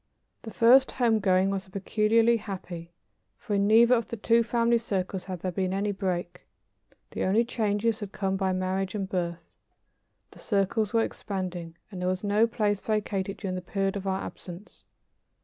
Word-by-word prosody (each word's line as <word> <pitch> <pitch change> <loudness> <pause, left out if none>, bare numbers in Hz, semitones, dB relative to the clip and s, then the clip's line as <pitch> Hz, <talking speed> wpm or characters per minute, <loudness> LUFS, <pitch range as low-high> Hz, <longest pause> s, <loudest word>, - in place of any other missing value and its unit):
The 225 - -8
first 250 +4 +5
home 230 -4 +2
going 190 -1 +2
was 195 0 -3
peculiarly 220 +4 +2
happy, 180 -5 -7 0.5
for 215 - -5
in 200 0 +2
neither 230 +3 +6
of 230 -2 +1
the 230 - -6
two 230 +2 +3
family 235 0 +2
circles 190 -4 -3
had 185 -3 -6
there 185 - -2
been 185 +1 -1
any 205 +1 0
break. 180 -3 -4 0.6
The - - -3
only 215 +5 +3
changes 220 -1 0
had 205 -3 -6
come 195 -1 -1
by 190 -1 0
marriage 185 +1 -2
and 195 -2 -2
birth. 170 -2 -4 0.8
The - - -16
circles 205 0 0
were 230 -1 +3
expanding, 180 -6 -5
and 185 -2 -7
there 180 - 0
was 185 +1 -2
no 210 +3 +3
place 210 -4 0
vacated 200 -2 -2
during 190 -2 -4
the 185 - -3
period 195 +2 -2
of 200 -1 -4
our 190 0 -1
absence. 180 +3 -10
195 Hz, 175 wpm, -27 LUFS, 185-220 Hz, 0.8 s, neither